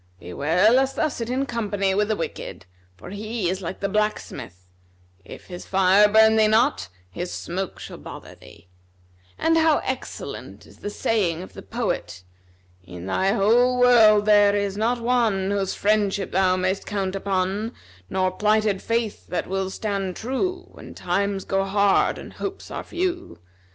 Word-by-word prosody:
Beware 160 - +2
lest 265 +2 +2
thou 310 - +1
sit 235 -4 -5
in 260 +2 0
company 205 -6 -1
with 210 +1 +1
the 215 - 0
wicked; 165 - -6 0.3
for 175 - -11
he 215 0 -3
is 190 +1 -3
like 180 +1 -6
the 200 - 0
blacksmith; 195 - -3 0.6
if - - -12
his 180 -1 -9
fire 195 +2 +5
burn 220 +1 +5
thee 215 -1 +5
not, 220 - +2 0.2
his 175 - -5
smoke 185 +2 -4
shall - - -9
bother - - -10
thee: 85 +1 -17 0.7
and 325 0 +2
how 320 -2 +4
excellent 260 -1 -6
is - - -18
the 205 - -5
saying 185 -6 -1
of - - -12
the - - -9
poet,[FN#256] 90 - -7
'In 90 0 -8
thy 190 - +1
whole 240 +4 +3
world 220 -4 +6
there 205 -1 +5
is 200 -1 -1
not 230 +4 0
one, 230 -5 +1
Whose 200 -2 -1
friendship 205 -2 +1
thou 185 0 +3
may'st 185 +1 -1
count 195 -2 -2
upon, 195 +3 -1 0.4
Nor 185 -1 0
plighted 210 0 +1
faith 230 -2 -2
that 180 - -2
will 190 0 -2
stand 195 -2 -3
true, 360 - -3
When - - -12
times 200 -1 -1
go 195 0 0
hard, 200 0 +2
and - - -10
hopes 390 0 -6
are - - -4
few. 355 - -3
200 Hz, 160 wpm, -23 LUFS, 185-225 Hz, 0.7 s, world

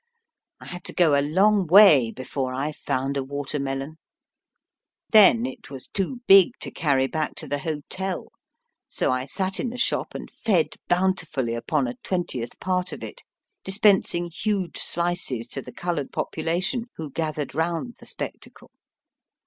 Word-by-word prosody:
I - - -12
had 180 -1 -6
to - - -4
go 165 -5 +4
a 140 - +4
long 190 +6 +3
way 160 - +7
before 130 +1 -4
I 140 +4 -2
found 135 -1 -2
a 135 - -1
water 140 +2 -4
melon. 135 +3 -4 1.1
Then 225 +2 +7
it 255 -3 -8
was 135 -2 -7
too 205 +6 -2
big 195 +4 +7
to - - -4
carry 140 -4 +1
back 155 +3 -2
to 155 - -6
the 145 +1 -2
hotel, 165 +5 -4 0.6
so - - 0
I 130 +1 -1
sat 190 +6 -1
in 250 - -1
the 245 - -7
shop 250 - -1
and - - -7
fed 190 -8 +1
bountifully 165 -9 0
upon 135 +4 0
a 120 0 -6
twentieth 150 -10 -3
part 180 0 -1
of - - -8
it, - - -8 0.4
dis 190 0 -1
pensing 180 -5 +3
huge 195 -1 -1
slices 170 -9 0
to 135 - -3
the - - -10
coloured 170 -6 -3
population, 175 +9 -2
who 155 -3 -7
gathered 155 -2 -3
round 165 - -2
the - - -13
spectacle. - - -7
165 Hz, 160 wpm, -24 LUFS, 140-190 Hz, 1.1 s, way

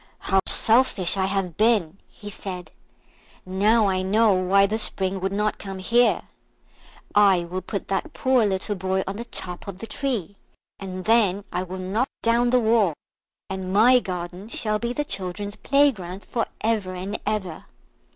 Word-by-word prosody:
"How 195 - +1
selfish 220 -6 +3
I 190 -1 +1
have 190 -4 -2
been!" 210 -6 +2
he 205 0 -10
said; 180 -3 -7 0.7
"now 210 +4 +3
I 185 -1 +1
know 210 +3 +3
why 190 +2 +3
the 215 +3 -1
Spring 190 -2 -1
would 190 +1 -2
not 210 +1 -1
come 195 -1 -6
here. 235 +6 +2 0.9
I 195 -4 +5
will 180 +2 -5
put 195 +2 -5
that 250 +11 -2
poor 260 -5 +2
little 200 0 0
boy 190 0 -1
on 195 +1 -5
the 235 - -6
top 180 -6 -6
of 195 -2 -6
the 225 - -7
tree, 225 - -3 0.4
and 185 -1 -6
then 205 -4 +3
I 180 - -1
will 185 0 -6
knock 195 +7 -1
down 235 +1 +3
the 250 +1 +4
wall, 220 -7 +2 0.5
and 190 -1 -5
my 240 +6 +6
garden 180 0 -6
shall 215 -2 -2
be 235 +1 -2
the 295 +4 -2
children's 200 -1 -4
playground 215 -10 +1
for 230 -2 -2
ever 210 -5 -1
and 190 +3 -4
ever." 195 -6 -3
200 Hz, 165 wpm, -24 LUFS, 185-225 Hz, 0.9 s, my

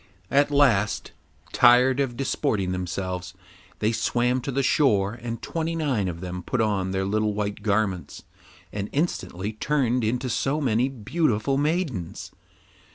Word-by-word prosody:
At 140 +1 +4
last, 125 -8 +2 0.4
tired 125 +2 +5
of 125 -4 -1
disporting 110 -8 0
themselves, 90 0 -4 0.4
they 110 +1 +1
swam 125 +2 +1
to 140 - -4
the 135 +1 0
shore, 105 -8 +3
and 120 0 -6
twenty 165 0 -2
nine 135 - 0
of 85 -1 -5
them 90 0 -5
put 130 - -2
on 100 -4 +1
their 95 0 -1
little 105 +1 0
white 105 0 -3
garments 100 -3 -1 0.5
and 100 0 -3
instantly 105 - -2
turned 125 0 0
into 125 +4 -1
so 135 +5 0
many 125 -2 +1
beautiful 135 0 0
maidens. 145 - -2
115 Hz, 140 wpm, -25 LUFS, 100-135 Hz, 0.5 s, tired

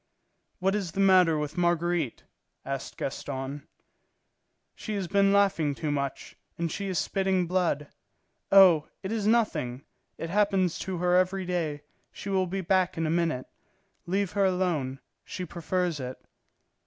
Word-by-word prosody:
"What 190 +1 +1
is 195 -6 -2
the - - -4
matter 185 -4 +5
with 150 +3 -3
Marguerite?" 175 -5 0 0.4
asked 135 0 -5
Gaston. 140 +1 -5 1.1
"She 215 - -5
has 195 -3 -2
been 200 +2 +3
laughing 195 -8 +2
too 150 +1 -2
much, 140 -2 -3 0.2
and 170 -1 -2
she 200 +4 -3
is 185 -2 -2
spitting 190 0 +1
blood. 175 -4 0 0.7
Oh, 185 -6 +7 0.2
it 190 - -4
is 215 -2 -1
nothing; 175 - +1 0.3
it 165 - -5
happens 195 -3 +2
to 190 -1 -3
her 180 +1 +2
every 185 +1 +2
day. 160 -5 -2 0.3
She 200 - -7
will 190 -1 +1
be 190 +2 -3
back 185 0 +1
in 165 - 0
a 155 - 0
minute. 165 -6 0 0.6
Leave 195 0 0
her 200 -1 +2
alone. 170 -8 0 0.2
She 185 - -6
prefers 175 0 -2
it." 130 0 -6
180 Hz, 150 wpm, -28 LUFS, 155-190 Hz, 1.1 s, Oh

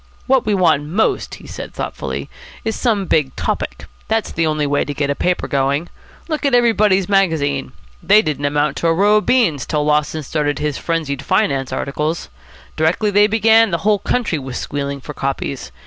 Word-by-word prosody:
"What 265 -3 +2
we 210 - +2
want 160 -6 +3
most," 195 +8 0
he - - -14
said - - -8
thoughtfully, - - -4 0.4
"is 220 - -1
some 215 -6 0
big 150 -6 +1
topic. - - -3 0.2
That's 220 0 -1
the 165 0 0
only 155 -1 0
way 145 0 +1
to 145 - -5
get 140 0 0
a - - +2
paper 180 +3 -1
going. 140 +3 0 0.4
Look 310 -2 -3
at 275 -3 +3
Everybody's 215 -6 +3
Magazine. 160 -9 +1 0.3
They 210 +2 +5
didn't 145 -2 -2
amount 145 +1 0
to 170 - 0
a 165 - +4
row 205 +4 +4
of 210 - -1
beans 185 - +2
till 150 -1 0
Lawson 150 +1 +1
started 145 0 -1
his 150 -2 -2
'Frenzied 155 -5 -2
Finance' 135 -2 0
articles. 150 - -3 0.5
Directly 170 +7 +1
they 205 +1 +5
began, 225 +1 +4
the 170 - 0
whole 210 -1 +3
country 210 -7 -1
was 130 -2 -6
squealing 140 -1 -4
for 150 - -8
copies. 135 - -4
160 Hz, 185 wpm, -18 LUFS, 145-210 Hz, 0.5 s, They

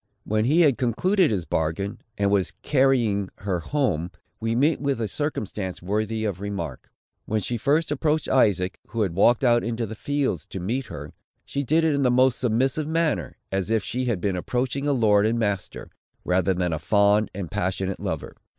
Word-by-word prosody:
When 110 +1 0
he 155 +7 +4
had 145 -7 +4
concluded 180 - +2
his 95 -6 -1
bargain, 80 +7 -2 0.2
and 100 -1 +1
was 100 -2 +1
carrying 120 -8 +2
her 95 -3 -1
home, 90 - -1 0.3
we 115 0 -1
meet 145 +6 +2
with 140 -3 0
a 110 - -1
circumstance 105 - -3
worthy 110 +4 -2
of 100 -3 -3
remark. 85 -10 -5 0.4
When 110 - 0
she 120 +4 -3
first 145 +7 +1
approached 150 +1 0
Isaac, 95 -8 +2
who 115 -1 -1
had 95 -5 -2
walked 115 +7 +4
out 120 -2 +4
into 115 0 -2
the 110 - -7
fields 145 +5 -2
to 95 - -6
meet 120 +8 -2
her, 75 +1 -8 0.3
she 140 - -2
did 155 +5 +2
it 160 -2 +3
in 140 - +1
the 130 - +3
most 130 0 +3
submissive 130 +5 +1
manner, 160 -2 0
as 95 0 -1
if 110 -2 +1
she 125 +5 -2
had 115 -7 0
been 95 +1 -1
approaching 125 +8 -2
a - - +3
lord 110 -5 +4
and 115 +1 0
master, 100 -4 -3 0.3
rather 95 +1 +2
than 90 -2 0
a 80 - -2
fond 100 +5 +3
and 95 -4 -5
passionate 95 -1 -2
lover. - - -4
110 Hz, 190 wpm, -24 LUFS, 95-135 Hz, 0.4 s, he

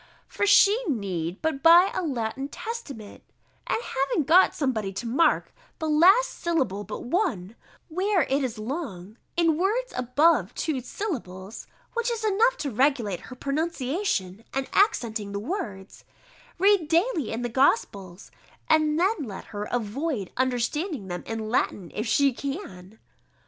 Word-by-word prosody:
_] - - -25 0.2
"For 405 - -1
she 410 +3 +6
need 190 - -3
but 315 -4 -1
buy 345 +5 +7
a - - -1
Latin 265 -4 -3
Testament, 290 - -7 0.5
and - - +1
having 270 - 0
got 340 +7 +5
somebody 225 -9 -1
to 235 +5 -5
mark 300 +7 +2 0.2
the 315 - -3
last 375 +11 +5
syllable 265 - -1
but 210 - -7
one, 245 - -1 0.3
where 370 +1 +1
it 275 +1 0
is 245 -3 -3
long, 220 - -6 0.2
in 330 -3 +3
words 455 +7 0
above 255 - +2
two 295 -5 -2
syllables 225 - -6 0.3
(which 470 0 0
is 460 -2 -2
enough 450 +5 +3
to 280 - -3
regulate 235 - +1
her 255 - -8
pronunciation 275 - -2
and 270 0 -1
accenting 225 - +1
the 200 - -2
words), 210 - -6 0.5
read 390 -3 +4
daily 335 - +1
in 230 +2 -3
the - - 0
Gospels, 200 -7 0 0.4
and 310 0 +3
then 395 +5 +2
let 210 -8 -7
her 205 0 -3
avoid 245 - -2
understanding 260 - -1
them 175 0 -5
in 225 -1 -4
Latin, 200 -6 -1
if 215 +3 -3
she 275 +4 +3
can." 235 - -7
270 Hz, 145 wpm, -26 LUFS, 215-340 Hz, 0.5 s, buy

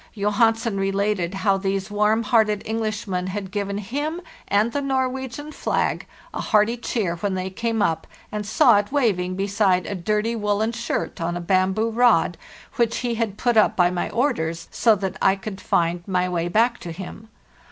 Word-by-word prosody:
Johansen 225 +1 +1
re 195 0 0
lated 200 -2 -1
how 195 0 +2
these 195 +1 -2
warm 210 +2 +2
hearted 215 -2 +2
Englishmen 215 -4 -2
had 190 0 -5
given 200 -1 -2
him 290 - -3 0.3
and 210 +3 +2
the 285 - -1
Norwegian 265 +1 -2
flag - - -1 0.3
a - - -3
hearty 215 +2 +3
cheer 215 -7 -2
when 195 +2 -2
they 185 0 -3
came 225 +2 -1
up 160 - -1 0.2
and 210 0 -3
saw 235 +1 +5
it 205 +3 -4
waving 195 -10 +1
beside 195 -2 +1
a - - -4
dirty 210 +5 -1
woollen 210 +1 0
shirt 235 -5 -3
on 175 +1 -1
a - - -4
bamboo 190 +5 +1
rod, 240 +2 +3 0.4
which 235 -1 +1
he 240 - 0
had 220 -3 -2
put 240 -2 +1
up 215 - +4
by 175 -1 +3
my 180 - -2
orders, 170 - -1
so 225 -2 +4
that 190 -1 -4
I 190 - +4
could 195 0 -7
find 170 0 +1
my 180 -1 +1
way 175 -1 -1
back 230 +7 +2
to 170 - -7
him. 195 +5 -9
205 Hz, 180 wpm, -23 LUFS, 190-230 Hz, 0.4 s, saw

